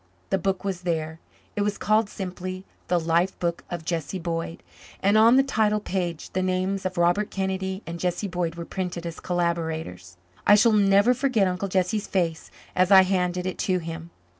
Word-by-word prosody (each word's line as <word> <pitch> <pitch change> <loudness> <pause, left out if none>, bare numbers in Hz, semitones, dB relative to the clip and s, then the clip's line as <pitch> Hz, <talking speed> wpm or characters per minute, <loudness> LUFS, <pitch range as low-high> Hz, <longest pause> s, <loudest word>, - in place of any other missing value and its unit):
The 195 - +2
book 190 +2 -1
was 190 -3 -3
there. 160 -2 -2 0.4
It 205 - -1
was 205 0 0
called 215 0 +2
simply, 185 -1 -6 0.2
The 175 - +2
Life 170 +3 +1
Book 170 -1 -2
of 170 -2 -5
Jesse 170 +1 -2
Boyd, 165 -1 -4 0.4
and 200 +2 +2
on 225 +3 +7
the 270 - +6
title 215 -5 +1
page 180 -5 -3
the 185 - -1
names 185 +1 0
of 185 0 -8
Robert 175 +5 +2
Kennedy 190 0 -3
and 170 +1 -6
Jesse 180 +3 -1
Boyd 175 -3 -2
were 170 0 -6
printed 175 -2 -4
as 165 -1 -6
collaborators. 160 - -3 0.3
I 205 - +8
shall 220 +2 +5
never 200 +3 +5
forget 250 -6 +1
Uncle 185 +2 -2
Jesse's 195 +3 0
face 170 -4 -1 0.3
as 185 0 +3
I 190 -1 +8
handed 180 -1 0
it 185 - -4
to 185 -1 +1
him. 165 -1 -6
185 Hz, 185 wpm, -25 LUFS, 170-195 Hz, 0.4 s, I